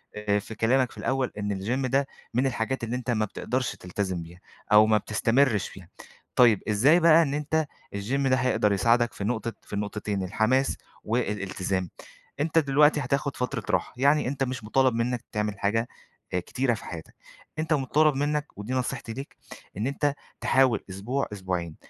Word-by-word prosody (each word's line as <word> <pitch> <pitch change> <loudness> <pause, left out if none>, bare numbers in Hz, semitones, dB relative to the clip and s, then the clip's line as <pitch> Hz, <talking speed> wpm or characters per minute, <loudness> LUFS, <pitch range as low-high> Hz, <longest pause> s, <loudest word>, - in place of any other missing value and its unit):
آآ، 105 -1 0
في 110 +2 -9
كلامك 125 +3 +2
في - - -15
الأول، 135 -1 -1
إن 100 -2 -2
الGym 130 +5 -1
ده 135 +2 +2 0.3
من 130 +3 +2
الحاجات 120 +1 -2
اللي 115 +2 -2
أنت 125 -1 -5
ما 110 -2 +1
بتقدرش 125 +4 -3
تلتزم 90 -1 -3
بيها 85 +2 -13 0.3
أو 105 +1 +8
ما 110 -1 +4
بتستمرِش 115 +2 +2
فيها. 90 -3 -13 0.5
طيّب 115 -5 +5
إزاي 135 +12 +5
بقى 165 0 +7
إن 140 -2 -2
أنت 150 +1 0 0.3
الGym 135 +8 0
ده 130 - +4
هيقدر 125 -5 +2
يساعدك 120 +4 +2
في 100 - -6
نقطة 115 +1 -2
في - - -14
النقطتين، 105 -1 -2
الحماس 110 +8 +1 0.3
والإلتزام، 95 -5 -2 0.5
أنت 155 +2 0
دلوقتي 150 +1 +4
هتاخد 140 +2 -1
فترة 125 -1 -2
راحة، - - 0
يعني 140 +2 +3
أنت 135 +1 -1
مش 125 -3 -3
مُطالب 130 +3 +2
منك 120 +1 -1
تعمل 105 -1 -2
حاجة 115 +4 +1 0.5
آآ، 90 - +2
كتيرة 125 +7 -1
في 105 - -7
حياتك، 80 -2 -8 0.4
أنت 160 0 +1
مُطالب 150 +1 +3
منك- 145 +1 0
ودي 105 +5 -5
نصيحتي 125 -2 -2
ليك- 135 +4 -8 0.4
إن 110 +5 -1
أنت 140 +1 0 0.3
تحاول 130 -4 +3
أسبوع 110 +9 -2
أسبوعين 90 -4 -3
120 Hz, 170 wpm, -26 LUFS, 105-135 Hz, 0.5 s, أو